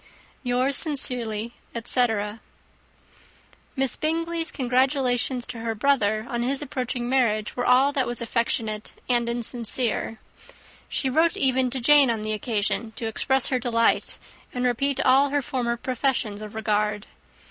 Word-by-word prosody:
"Yours 255 Hz, +2 st, 0 dB
sincerely," 240 Hz, -7 st, -1 dB, 0.2 s
etc. 225 Hz, -3 st, -1 dB, 1.3 s
Miss 265 Hz, -2 st, +1 dB
Bingley's 330 Hz, +1 st, -2 dB
congratulations 255 Hz, -1 st, 0 dB
to 245 Hz, -2 st, -8 dB
her 225 Hz, 0 st, -3 dB
brother 215 Hz, -3 st, +1 dB
on 240 Hz, -1 st, -3 dB
his 270 Hz, +4 st, 0 dB
approaching 250 Hz, -3 st, -4 dB
marriage 230 Hz, -5 st, 0 dB
were 245 Hz, -, -2 dB
all 260 Hz, +3 st, +4 dB
that 275 Hz, -3 st, 0 dB
was 240 Hz, 0 st, -3 dB
affectionate 225 Hz, -2 st, -2 dB
and 240 Hz, -1 st, +1 dB
insincere. 235 Hz, -1 st, +3 dB, 0.7 s
She 270 Hz, -, -1 dB
wrote 320 Hz, +6 st, +2 dB
even 260 Hz, -1 st, +2 dB
to 260 Hz, +2 st, -2 dB
Jane 280 Hz, +1 st, +5 dB
on 225 Hz, -2 st, -2 dB
the 215 Hz, 0 st, -2 dB
occasion, 220 Hz, +1 st, -2 dB
to 230 Hz, -, -5 dB
express 265 Hz, +4 st, +1 dB
her 255 Hz, -, 0 dB
delight, 230 Hz, -2 st, +1 dB, 0.3 s
and 250 Hz, 0 st, -3 dB
repeat 275 Hz, +3 st, 0 dB
all 270 Hz, +2 st, +4 dB
her 285 Hz, 0 st, -1 dB
former 240 Hz, -2 st, -2 dB
professions 235 Hz, -4 st, -2 dB
of 215 Hz, 0 st, -9 dB
regard. 210 Hz, -1 st, -1 dB
245 Hz, 135 wpm, -24 LUFS, 225-265 Hz, 1.3 s, Jane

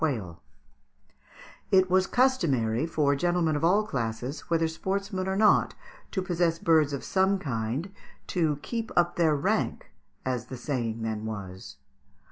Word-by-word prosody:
] 70 Hz, -, -24 dB
It 190 Hz, -1 st, +5 dB
was 185 Hz, +1 st, +4 dB
customary 155 Hz, -, +2 dB
for 145 Hz, -3 st, +1 dB
gentlemen 170 Hz, +1 st, +1 dB
of 145 Hz, -, -2 dB
all 200 Hz, +6 st, +4 dB
classes, 125 Hz, -, -4 dB
whether 165 Hz, -1 st, +2 dB
sportsmen 190 Hz, +3 st, -3 dB
or 190 Hz, -, 0 dB
not, 210 Hz, +1 st, +4 dB, 0.3 s
to 190 Hz, -, -2 dB
possess 175 Hz, -2 st, +1 dB
birds 160 Hz, -3 st, +3 dB
of 140 Hz, -, -4 dB
some 190 Hz, +1 st, +2 dB
kind, 135 Hz, -, -3 dB, 0.3 s
"to 160 Hz, -5 st, 0 dB
keep 230 Hz, -1 st, -4 dB
up 175 Hz, 0 st, +2 dB
their 160 Hz, -3 st, +3 dB
rank," 140 Hz, -, -1 dB, 0.3 s
as 125 Hz, -2 st, -2 dB
the 130 Hz, -, -7 dB
saying 120 Hz, -4 st, -3 dB
then 110 Hz, -1 st, -3 dB
was. 95 Hz, -6 st, -7 dB
160 Hz, 140 wpm, -27 LUFS, 125-185 Hz, 0.3 s, It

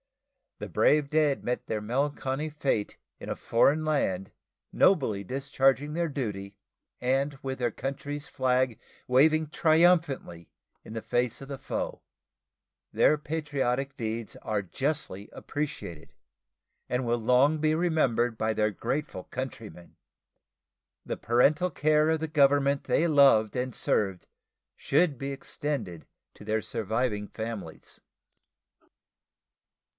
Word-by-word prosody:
The -, -, -7 dB
brave 150 Hz, -2 st, +3 dB
dead 150 Hz, -3 st, +2 dB
met 125 Hz, +1 st, -2 dB
their 110 Hz, -1 st, -3 dB
melancholy 135 Hz, +5 st, -1 dB
fate 140 Hz, -8 st, -2 dB, 0.2 s
in -, -, -8 dB
a -, -, -2 dB
foreign 140 Hz, +7 st, +2 dB
land, 95 Hz, -11 st, 0 dB, 0.4 s
nobly 120 Hz, -, +3 dB
discharging 135 Hz, +4 st, +1 dB
their 170 Hz, 0 st, -1 dB
duty, 105 Hz, -8 st, -4 dB, 0.4 s
and 135 Hz, +3 st, 0 dB
with 135 Hz, -1 st, -3 dB
their 120 Hz, -2 st, 0 dB
country's 140 Hz, +4 st, -5 dB
flag 130 Hz, -2 st, 0 dB, 0.3 s
waving 155 Hz, +4 st, +4 dB
triumphantly 155 Hz, -, +2 dB, 0.3 s
in -, -, -10 dB
the 115 Hz, -, -4 dB
face 120 Hz, 0 st, -1 dB
of 135 Hz, -, -8 dB
the 140 Hz, -, -5 dB
foe. 135 Hz, -, -4 dB, 0.9 s
Their 155 Hz, -, +4 dB
patriotic 140 Hz, -3 st, -2 dB
deeds 115 Hz, -2 st, -4 dB
are 105 Hz, -2 st, -2 dB
justly 120 Hz, -, -3 dB
appreciated, 140 Hz, -, -6 dB, 0.8 s
and 125 Hz, 0 st, -1 dB
will 120 Hz, 0 st, +1 dB
long 125 Hz, +7 st, +3 dB
be 155 Hz, 0 st, +2 dB
remembered 135 Hz, -9 st, +1 dB
by 110 Hz, 0 st, 0 dB
their 105 Hz, 0 st, +1 dB
grateful 120 Hz, -, -3 dB
countrymen. 115 Hz, -8 st, -7 dB, 1.1 s
The -, -, -3 dB
parental 150 Hz, +9 st, +2 dB
care 155 Hz, +1 st, +3 dB
of 160 Hz, 0 st, +2 dB
the 160 Hz, -, -2 dB
Government 140 Hz, -1 st, +3 dB
they 170 Hz, -, +2 dB
loved 135 Hz, -8 st, +5 dB
and 125 Hz, 0 st, -2 dB
served 95 Hz, -5 st, -1 dB, 0.5 s
should 160 Hz, -6 st, +1 dB
be 135 Hz, +2 st, -4 dB
extended 135 Hz, -, -5 dB, 0.3 s
to -, -, -13 dB
their 110 Hz, 0 st, 0 dB
surviving 110 Hz, -1 st, -2 dB
families. 110 Hz, -8 st, -7 dB
135 Hz, 120 wpm, -28 LUFS, 110-150 Hz, 1.1 s, loved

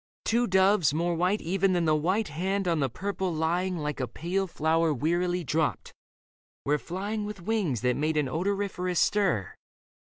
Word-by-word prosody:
Two 235 Hz, +1 st, +2 dB
doves, 190 Hz, -5 st, +3 dB
more 170 Hz, +2 st, 0 dB
white 180 Hz, +5 st, +1 dB
Even 190 Hz, +2 st, +1 dB
than 175 Hz, -2 st, +1 dB
the 155 Hz, -1 st, +3 dB
white 185 Hz, +7 st, 0 dB
hand 190 Hz, +5 st, -1 dB
on 165 Hz, -2 st, +1 dB
the 135 Hz, -2 st, +1 dB
purple 190 Hz, +5 st, -3 dB
lying 175 Hz, +3 st, 0 dB
Like 150 Hz, -2 st, -3 dB
a 130 Hz, -, -1 dB
pale 190 Hz, +7 st, -2 dB
flower 160 Hz, 0 st, +1 dB
wearily 175 Hz, +5 st, 0 dB
dropped, 155 Hz, 0 st, -1 dB, 0.7 s
were 150 Hz, +1 st, +2 dB
flying 205 Hz, +6 st, -4 dB
With 205 Hz, -3 st, -7 dB
wings 195 Hz, -, 0 dB
that 125 Hz, 0 st, +1 dB
made 155 Hz, +1 st, 0 dB
an 150 Hz, -2 st, +1 dB
odoriferous 180 Hz, +2 st, -1 dB
stir. 190 Hz, -, +1 dB
175 Hz, 165 wpm, -28 LUFS, 155-195 Hz, 0.7 s, doves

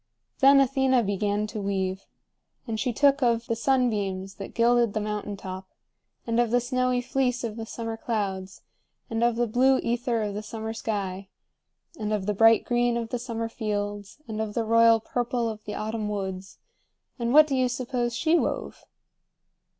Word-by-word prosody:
Then 275 Hz, +1 st, +7 dB
Athena 265 Hz, -2 st, +3 dB
began 205 Hz, +1 st, 0 dB
to 215 Hz, 0 st, -5 dB
weave. 190 Hz, -1 st, -2 dB, 0.6 s
And 225 Hz, -3 st, -3 dB
she 250 Hz, +2 st, 0 dB
took 280 Hz, +4 st, +3 dB
of 235 Hz, -2 st, +2 dB
the 230 Hz, -, -1 dB
sunbeams 210 Hz, -7 st, 0 dB
that 195 Hz, -, -8 dB
gilded 235 Hz, -2 st, +3 dB
the -, -, 0 dB
mountain 210 Hz, -1 st, -4 dB
top, 190 Hz, 0 st, -7 dB, 0.6 s
and 230 Hz, 0 st, 0 dB
of 240 Hz, -1 st, +2 dB
the 245 Hz, +2 st, +3 dB
snowy 255 Hz, 0 st, 0 dB
fleece 250 Hz, 0 st, -1 dB
of 225 Hz, -3 st, -3 dB
the 225 Hz, -1 st, -6 dB
summer 225 Hz, -1 st, -5 dB
clouds, 195 Hz, -5 st, -3 dB, 0.5 s
and 225 Hz, +1 st, 0 dB
of 240 Hz, -1 st, +3 dB
the 240 Hz, +1 st, +1 dB
blue 255 Hz, +4 st, +3 dB
ether 235 Hz, -1 st, 0 dB
of 205 Hz, -1 st, -3 dB
the 210 Hz, -, -4 dB
summer 220 Hz, +1 st, -5 dB
sky, 195 Hz, -4 st, -4 dB, 0.7 s
and 215 Hz, -1 st, -2 dB
of 210 Hz, -3 st, -1 dB
the 210 Hz, -, 0 dB
bright 225 Hz, +2 st, +5 dB
green 240 Hz, -1 st, +1 dB
of 230 Hz, -1 st, -4 dB
the 245 Hz, -, -3 dB
summer 230 Hz, -2 st, -3 dB
fields, 205 Hz, -2 st, -4 dB
and 220 Hz, -1 st, -3 dB
of 215 Hz, -1 st, -4 dB
the 230 Hz, -, 0 dB
royal 230 Hz, 0 st, +5 dB
purple 240 Hz, +1 st, -2 dB
of 215 Hz, -1 st, -6 dB
the 210 Hz, -, -5 dB
autumn 215 Hz, 0 st, -3 dB
woods, 190 Hz, -2 st, -5 dB, 0.6 s
and 235 Hz, 0 st, -1 dB
what 305 Hz, +3 st, +8 dB
do 280 Hz, -3 st, -2 dB
you 255 Hz, -1 st, +2 dB
suppose 245 Hz, -1 st, -2 dB
she 325 Hz, +5 st, +3 dB
wove? -, -, -3 dB
225 Hz, 180 wpm, -26 LUFS, 210-245 Hz, 0.7 s, what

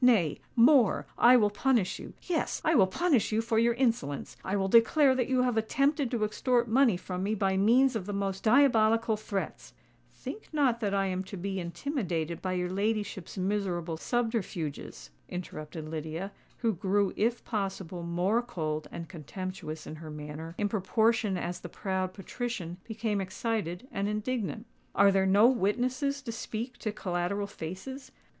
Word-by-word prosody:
Nay—more: 235 Hz, -, +4 dB
I 250 Hz, +1 st, +7 dB
will 210 Hz, -3 st, +3 dB
punish 230 Hz, -2 st, +1 dB
you—yes, 345 Hz, -3 st, -3 dB
I 320 Hz, -, +4 dB
will 195 Hz, -, +6 dB
punish 280 Hz, -, +2 dB
you 215 Hz, -, +2 dB
for 225 Hz, 0 st, +1 dB
your 235 Hz, 0 st, +3 dB
insolence! 235 Hz, -, -1 dB
I 190 Hz, -, -1 dB
will 195 Hz, -1 st, +1 dB
declare 260 Hz, +6 st, +5 dB
that 255 Hz, -2 st, 0 dB
you 255 Hz, -1 st, +3 dB
have 245 Hz, -3 st, +1 dB
attempted 275 Hz, +5 st, +1 dB
to 230 Hz, -3 st, -1 dB
extort 240 Hz, +3 st, +1 dB
money 235 Hz, -3 st, +4 dB
from 180 Hz, 0 st, -5 dB
me 205 Hz, +3 st, 0 dB
by 195 Hz, -2 st, +1 dB
means 240 Hz, +6 st, +4 dB
of 200 Hz, -4 st, -3 dB
the -, -, -2 dB
most 195 Hz, -1 st, -2 dB
diabolical 225 Hz, -3 st, +4 dB
threats——" 205 Hz, -2 st, -5 dB, 0.4 s
"Think 435 Hz, -, -8 dB
not 275 Hz, -6 st, +2 dB
that 205 Hz, -3 st, 0 dB
I 195 Hz, 0 st, +2 dB
am 185 Hz, -1 st, -1 dB
to 195 Hz, +1 st, -7 dB
be 190 Hz, +1 st, -3 dB
intimidated 170 Hz, -, -3 dB
by 185 Hz, -1 st, -2 dB
your 180 Hz, 0 st, -1 dB
ladyship's 205 Hz, -1 st, -2 dB
miserable 185 Hz, -4 st, -1 dB
subterfuges," 190 Hz, -, -3 dB, 0.2 s
interrupted 155 Hz, -3 st, -6 dB
Lydia, 160 Hz, +4 st, -4 dB, 0.3 s
who 230 Hz, -2 st, +1 dB
grew 195 Hz, +2 st, +1 dB
if 235 Hz, +3 st, 0 dB
possible 190 Hz, -5 st, -3 dB
more 175 Hz, +7 st, +1 dB
cold 155 Hz, -10 st, -3 dB
and 170 Hz, -1 st, -6 dB
contemptuous 170 Hz, -1 st, -6 dB
in 155 Hz, -, -7 dB
her 155 Hz, 0 st, -9 dB
manner 150 Hz, +2 st, -7 dB
in 205 Hz, -, +1 dB
proportion 215 Hz, +1 st, +1 dB
as 175 Hz, 0 st, -3 dB
the 175 Hz, -, -8 dB
proud 185 Hz, +1 st, -2 dB
patrician 195 Hz, -4 st, -5 dB
became 220 Hz, -2 st, -1 dB
excited 190 Hz, 0 st, -3 dB
and 200 Hz, 0 st, -1 dB
indignant. 210 Hz, -, -2 dB, 0.3 s
"Are 200 Hz, 0 st, +6 dB
there 190 Hz, 0 st, +2 dB
no 200 Hz, +3 st, +6 dB
witnesses 255 Hz, +5 st, +1 dB
to 235 Hz, -, -4 dB
speak 230 Hz, +2 st, -5 dB
to 215 Hz, -, -2 dB
collateral 185 Hz, 0 st, -2 dB
faces? 205 Hz, -, -7 dB
205 Hz, 160 wpm, -29 LUFS, 185-235 Hz, 0.4 s, I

